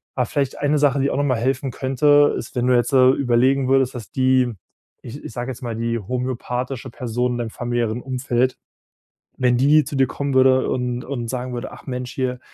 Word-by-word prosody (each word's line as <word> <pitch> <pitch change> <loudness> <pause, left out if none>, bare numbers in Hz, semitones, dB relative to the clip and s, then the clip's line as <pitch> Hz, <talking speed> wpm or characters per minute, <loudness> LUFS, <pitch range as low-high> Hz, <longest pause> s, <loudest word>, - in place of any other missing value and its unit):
Aber 125 - +1
vielleicht 140 0 -2
eine 145 +1 +1
Sache, 140 -1 +3
die 140 +1 +1
auch - - -2
noch 145 - +1
mal 130 -4 +1
helfen 130 +2 -1
könnte, 145 +3 +3
ist, - - -8
wenn 125 0 0
du 125 - +4
jetzt 120 +3 +1
da 130 -1 +6
überlegen 130 +1 +2
würdest, 135 -1 +2
dass 115 -4 -8
die, 130 -2 +2 0.5
ich 130 +5 -9
ich - - -7
sag 120 +1 -4
jetzt 130 +1 -7
mal 115 -2 -3
die 115 +1 -1
homöopathische 125 +3 -4
Person 125 +1 -2
in - - -3
deinem 115 -2 -3
familiären 120 -1 -2
Umfeld 130 -1 -1 0.8
wenn 125 -1 +3
die 145 +2 +5
zu 140 - -5
dir 135 -1 +4
kommen 140 -1 -3
würde 130 0 +4
und 125 -1 -2
und 120 -4 -4
sagen 125 +1 -4
würde: 120 - -5
„Ach - - -13
Mensch 125 -1 -4
hier, 125 -2 -2
130 Hz, 210 wpm, -21 LUFS, 120-135 Hz, 0.8 s, da